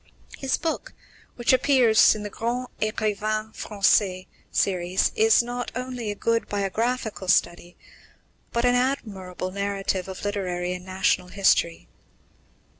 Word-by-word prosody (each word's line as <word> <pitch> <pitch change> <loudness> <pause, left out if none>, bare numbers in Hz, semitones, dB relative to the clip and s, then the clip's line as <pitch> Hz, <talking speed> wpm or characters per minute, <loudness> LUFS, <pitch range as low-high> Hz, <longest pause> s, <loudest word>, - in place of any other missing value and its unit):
His 270 -1 0
book, 340 +9 -4 0.4
which 240 +1 +2
appears 255 -5 +5
in 210 - -6
the 210 - -6
Grands 245 +4 -3
Ecrivains 215 0 -1
Français 195 -2 +1 0.3
series, 185 -1 +1
is 445 - +5
not 245 0 -4
only 250 -3 -4
a 205 - -3
good 230 +2 0
biographical 210 +1 -2
study, 175 0 +1 0.7
but 235 +1 0
an 245 - +4
admirable 200 -8 -2
narrative 195 -1 -2
of 190 +1 -7
literary 180 -3 -2
and 180 0 -7
national 185 -1 0
history. 90 - +1
210 Hz, 120 wpm, -25 LUFS, 185-240 Hz, 0.7 s, appears